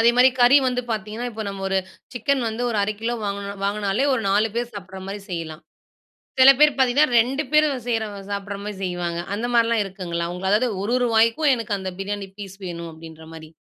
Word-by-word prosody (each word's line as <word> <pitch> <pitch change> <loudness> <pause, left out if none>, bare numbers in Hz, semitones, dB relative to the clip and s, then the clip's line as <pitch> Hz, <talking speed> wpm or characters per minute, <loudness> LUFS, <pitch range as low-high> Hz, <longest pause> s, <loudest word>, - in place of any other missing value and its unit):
அதேமாரி, 240 +3 +6
கறி 245 +3 +7
வந்து 250 -1 0
பார்த்தீங்கன்னா, 220 +2 -3
இப்ப 220 0 -5
நம்ம 195 -1 -6
ஒரு 195 0 +1 0.3
சிக்கன் 260 +3 0
வந்து 225 +2 -4 0.2
1/2 210 +1 -1
கிலோ 235 +2 -1
வாங்கினோ 200 0 -3
வாங்கினாலே, 205 +4 0
ஒரு 240 - -2
4 210 +3 +3
பேரு 240 0 -1
சாப்பிடுற 190 -1 -8
மாரி 200 +1 -5
செய்யலாம். 165 -2 -5 0.8
சில 260 +1 +9
பேரு 300 0 +7
பார்த்தீங்கன்னா, 265 +4 +4
2 265 +6 +1
பேரு 305 0 +5 0.2
செய்ற 225 -2 0 0.3
சாப்பிடுற 200 0 -4
மாரி 210 0 -5
செய்வாங்க. 175 -2 -2
அந்த 230 +4 -2
மாரிலாம் 230 -2 +3
இருக்குங்களா? 175 -3 -4
உங்களால, 190 +3 +1
அதாவது 250 - 0
ஒரொரு 245 +3 +1
வாய்க்கும், 230 +7 +4
எனக்கு 220 -4 -3
அந்த 190 -1 -4
பிரியாணி 200 0 -4
பீஸ் 195 -2 -9
வேணும். 170 -1 -6
அப்பிடீன்ற 160 0 -12
மாரி. 160 -1 -10
210 Hz, 185 wpm, -23 LUFS, 190-240 Hz, 0.8 s, சில